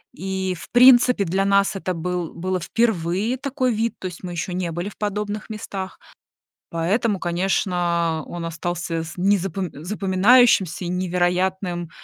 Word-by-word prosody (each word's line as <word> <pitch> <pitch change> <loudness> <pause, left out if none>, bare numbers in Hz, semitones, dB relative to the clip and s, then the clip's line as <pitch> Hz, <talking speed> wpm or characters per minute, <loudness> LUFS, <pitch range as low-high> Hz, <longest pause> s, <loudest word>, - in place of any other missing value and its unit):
и 190 +1 -3
в - - -11
принципе 245 -3 +6
для 190 +3 0
нас 200 0 +3
это 185 -1 -2
был 175 0 -3
было 185 +2 -2
впервые 210 +3 0
такой 260 -3 -1
вид. 225 +2 -1
То 185 - -4
есть 180 +1 -10
мы 180 - -5
ещё 175 +2 -4
не 180 -2 -2
были 175 +4 -4
в - - -16
подобных 210 +1 -3
местах. 195 -3 -6 0.7
Поэтому, 195 +5 0
конечно, 175 -2 0
он 170 -1 -6
остался 165 0 -3
с 165 - -9
незапом 190 -1 0
запоминающимся 195 - +3
и - - -3
невероятным 180 0 -1
185 Hz, 145 wpm, -22 LUFS, 175-205 Hz, 0.7 s, принципе